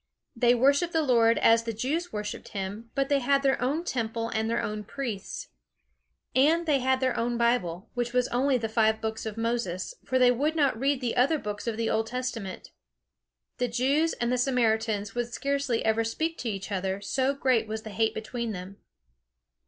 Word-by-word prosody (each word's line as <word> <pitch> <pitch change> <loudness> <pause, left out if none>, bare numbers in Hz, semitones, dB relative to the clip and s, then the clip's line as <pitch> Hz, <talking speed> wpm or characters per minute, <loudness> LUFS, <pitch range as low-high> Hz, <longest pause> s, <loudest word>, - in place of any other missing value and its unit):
They 240 +1 +4
worshipped 280 +7 +3
the 320 -1 +2
Lord 230 -4 +4
as 230 0 +5
the 230 0 -4
Jews 300 +11 -2
worshipped 210 0 -5
him, 200 +4 -5
but 275 -1 +1
they 285 0 +2
had 275 +2 +2
their 270 -2 +2
own 285 +7 0
Temple 230 -6 -2
and 220 0 -1
their 230 - +1
own 210 0 -3
priests. 225 -3 -5 0.9
And 315 +6 +4
they 295 -4 +3
had 260 +1 +1
their 255 -1 +1
own 240 +1 -1
Bible, 235 -5 0
which 240 -1 -2
was 250 0 +2
only 260 +2 +2
the 225 -2 -2
five 220 0 +2
books 220 0 -4
of 220 0 -6
Moses; 230 - -2
for 260 - 0
they 250 -1 +6
would 290 +6 0
not 280 -7 +2
read 275 0 +1
the 240 -2 -1
other 265 +6 +3
books 210 -3 -5
of 225 -2 -1
the 230 -1 0
old 220 0 0
Testament. 240 -6 -5 0.9
The 250 - +1
Jews 275 +7 +1
and 240 0 -1
the 250 - +1
Samaritans 220 -5 +1
would 240 0 -2
scarcely 275 -2 -1
ever 220 +1 +2
speak 320 +9 -2
to 240 - -2
each 195 -1 -5
other, 190 0 -1
so 260 +7 0
great 255 -5 +2
was 220 0 -4
the 220 - -7
hate 220 +2 0
between 230 0 -4
them. 185 +1 -8
235 Hz, 195 wpm, -27 LUFS, 220-265 Hz, 0.9 s, they